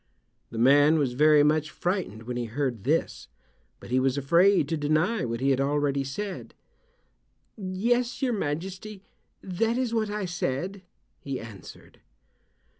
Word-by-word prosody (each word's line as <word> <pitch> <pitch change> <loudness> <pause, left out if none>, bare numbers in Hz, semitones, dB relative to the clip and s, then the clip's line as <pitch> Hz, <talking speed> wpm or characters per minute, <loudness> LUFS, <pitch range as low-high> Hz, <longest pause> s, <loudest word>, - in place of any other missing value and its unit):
The 115 - -8
man 145 +6 +5
was 135 -5 0
very 150 +2 +5
much 155 +1 +2
frightened 175 - -3
when 125 +1 -5
he 120 -1 -2
heard 120 -2 -3
this, 155 +4 0 0.5
but - - -12
he 130 - +3
was 130 +1 +1
afraid 170 +4 +4
to 165 - 0
deny 155 - +1
what 115 0 -4
he 135 +1 +3
had 135 0 +1
already 140 0 0
said. 190 +9 -6 1.0
"Yes, 230 +5 -1
your 255 -3 0
majesty, 190 +4 -4 0.4
that 225 +6 -1
is 250 -3 -1
what 220 -2 0
I 210 -1 -3
said," 175 +2 -3 0.4
he 135 -2 -5
answered. 105 -5 -12
155 Hz, 145 wpm, -27 LUFS, 135-195 Hz, 1.0 s, man